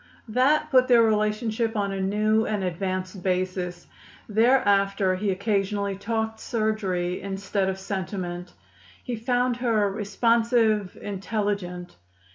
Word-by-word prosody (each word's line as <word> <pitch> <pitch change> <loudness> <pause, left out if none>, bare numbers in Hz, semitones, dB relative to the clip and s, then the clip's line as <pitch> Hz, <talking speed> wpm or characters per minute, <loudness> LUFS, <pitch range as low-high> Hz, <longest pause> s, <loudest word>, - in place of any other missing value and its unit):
That 285 +7 +2
put 255 -1 +5
their 240 -2 +6
relationship 220 +1 0
on 200 -1 0
a 195 0 -3
new 215 +3 +2
and 210 -3 -1
advanced 185 +1 -3
basis. 180 -1 -2 0.4
Thereafter 200 -4 +3
he 200 +2 -1
occasionally 200 0 0
talked 220 +2 -2
surgery 200 -7 -1
instead 195 0 -2
of 190 - -3
sentiment. 185 -2 -5 0.5
He 245 - -3
found 245 +1 0
her 220 -5 +1
responsive, 220 0 +1
intelligent. 200 -3 -3
205 Hz, 110 wpm, -25 LUFS, 190-225 Hz, 0.5 s, their